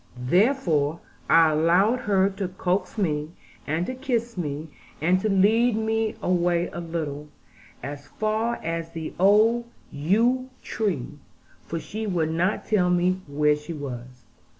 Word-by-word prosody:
Therefore 165 Hz, -, +2 dB, 0.3 s
I 165 Hz, -1 st, +6 dB
allowed 175 Hz, +10 st, +3 dB
her 195 Hz, -5 st, +2 dB
to 195 Hz, -1 st, -3 dB
coax 185 Hz, +3 st, -2 dB
me, 155 Hz, -5 st, -1 dB, 0.3 s
and 160 Hz, +4 st, 0 dB
to 255 Hz, -, -4 dB
kiss 240 Hz, -2 st, -2 dB
me, 155 Hz, -2 st, -4 dB, 0.3 s
and 180 Hz, +4 st, +2 dB
to 215 Hz, -, -1 dB
lead 215 Hz, +4 st, +4 dB
me 220 Hz, 0 st, 0 dB
away 175 Hz, -1 st, +1 dB
a -, -, -5 dB
little, 155 Hz, -3 st, -4 dB, 0.6 s
as 140 Hz, +1 st, -7 dB
far 220 Hz, +6 st, -1 dB
as 165 Hz, 0 st, -3 dB
the 165 Hz, -1 st, -6 dB
old 215 Hz, +5 st, +4 dB, 0.3 s
yew 230 Hz, -, +1 dB
tree; 155 Hz, -, -3 dB, 0.5 s
for 165 Hz, -, -3 dB
she 215 Hz, +6 st, -5 dB
would 165 Hz, -5 st, 0 dB
not 175 Hz, +5 st, 0 dB
tell 185 Hz, -5 st, +2 dB
me 180 Hz, +1 st, +2 dB
where 150 Hz, +1 st, +2 dB
she 150 Hz, +3 st, -7 dB
was. 125 Hz, -4 st, -8 dB
180 Hz, 140 wpm, -25 LUFS, 155-215 Hz, 0.6 s, I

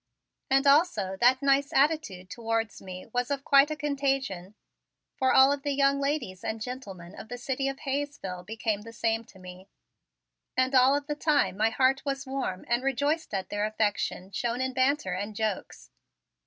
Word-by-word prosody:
And, 270 Hz, +1 st, +3 dB
also, 275 Hz, -, +3 dB
that 255 Hz, +3 st, +4 dB
nice 280 Hz, +1 st, +3 dB
attitude 275 Hz, -, +1 dB
towards 225 Hz, -2 st, -2 dB
me 185 Hz, -1 st, -8 dB
was 245 Hz, 0 st, 0 dB
of 280 Hz, -1 st, -2 dB
quite 275 Hz, +1 st, +5 dB
a 310 Hz, -, -2 dB
contagion, 270 Hz, -10 st, -2 dB, 0.6 s
for 260 Hz, -1 st, +2 dB
all 265 Hz, +1 st, +7 dB
of 285 Hz, -1 st, -1 dB
the 285 Hz, 0 st, -1 dB
young 275 Hz, 0 st, +3 dB
ladies 275 Hz, -10 st, -2 dB
and 220 Hz, 0 st, -3 dB
gentlemen 200 Hz, -8 st, -7 dB
of 220 Hz, -, -11 dB
the 245 Hz, -, -5 dB
city 265 Hz, +2 st, -2 dB
of 275 Hz, 0 st, -4 dB
Hayesville 275 Hz, -10 st, -4 dB
became 215 Hz, +1 st, -3 dB
the 230 Hz, +2 st, -11 dB
same 225 Hz, 0 st, 0 dB
to 190 Hz, -, -18 dB
me 185 Hz, +1 st, -12 dB, 0.9 s
and 255 Hz, +1 st, +2 dB
all 260 Hz, +1 st, +6 dB
of 285 Hz, 0 st, -2 dB
the 295 Hz, -, -2 dB
time 295 Hz, -, +1 dB
my 220 Hz, +3 st, +2 dB
heart 265 Hz, +3 st, +2 dB
was 275 Hz, -1 st, -3 dB
warm 260 Hz, -9 st, -4 dB
and 240 Hz, +1 st, +1 dB
rejoiced 285 Hz, +5 st, 0 dB
at 190 Hz, -1 st, -3 dB
their 205 Hz, 0 st, -2 dB
affection 205 Hz, -3 st, -2 dB
shown 235 Hz, +5 st, -2 dB
in 260 Hz, 0 st, -1 dB
banter 260 Hz, -7 st, +1 dB
and 205 Hz, +3 st, -4 dB
jokes. 215 Hz, -2 st, -4 dB
255 Hz, 180 wpm, -28 LUFS, 205-275 Hz, 0.9 s, all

